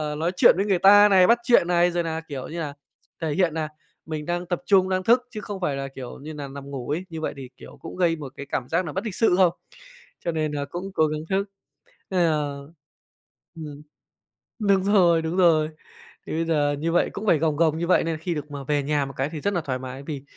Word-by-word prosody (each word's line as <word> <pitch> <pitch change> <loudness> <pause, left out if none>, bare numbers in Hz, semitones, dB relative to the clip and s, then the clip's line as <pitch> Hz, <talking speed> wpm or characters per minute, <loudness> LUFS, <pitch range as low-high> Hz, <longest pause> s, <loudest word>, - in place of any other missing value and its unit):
nói 165 +3 -1
chuyện - - +7
với 200 - +1
người 190 -4 +1
ta 205 +2 +7
này, 185 -2 +6
bắt 235 - +5
chuyện 235 -8 +4
này, 175 0 +3
rồi 175 0 -1
nà, 160 0 -3
kiểu 135 -3 -6
như 170 +1 -6
là, 145 -3 -4 0.5
thể 155 -2 -1
hiện 175 -3 +1
nà 155 -1 -2 0.4
mình 155 -1 -5
đang 175 +1 -2
tập 175 0 -3
trung, 190 -2 +4
đang 185 0 0
thức 245 +3 +3
chứ 215 -3 -6
không 200 -2 -7
phải 145 -5 0
là, 135 0 -4
kiểu 130 -2 -9
như 155 +3 -8
nà, 145 -2 -6
nằm 140 0 -9
ngủ 125 -3 -6
ấy. 170 +5 -2
Như 160 -1 -6
vậy - - -2
thì, 130 -2 -8
kiểu, - - -13
cũng 165 - -8
gây 175 -3 +2
một 140 -4 -9
cái 140 - -6
cảm 125 -2 -3
giác 175 +2 +1
nà 155 - -5
bất 190 +7 -4
lịch 210 -5 -4
sự 225 -6 +3
không? 180 -3 +4 0.7
Cho 170 - +1
nên 155 -2 -1
là 145 -1 -3
cũng 180 +6 -6
cố 155 -3 +3
gắng 150 0 -3
thức. 195 +1 +1 0.6
Nên 185 -2 +1
là 150 -4 0 1.0
ừm, 150 -3 -8 0.8
đúng 200 -3 +2
rồi, 180 -5 +4
đúng 160 +2 -3
rồi. 160 -4 +4 0.6
Thì - - -6
bây 165 +1 0
giờ 145 -3 +1
như 165 +2 -1
vậy 175 - +2
cũng 210 +2 -5
phải 165 - +4
gồng 155 -1 0
gồng 160 -1 +2
như 170 - -2
vậy 180 - +3
nên 165 -1 -2
khi 170 +1 -3
được 150 0 -6
mà 140 -1 -6
về 145 +1 0
nhà 145 0 0
một 135 - -8
cái 135 +3 -1
thì 155 -2 -6
rất 200 +3 -1
là 175 - +1
thoải 130 -4 -3
mái 130 +1 -7
vì 140 -2 -6
160 Hz, 255 wpm, -24 LUFS, 145-180 Hz, 1.0 s, chuyện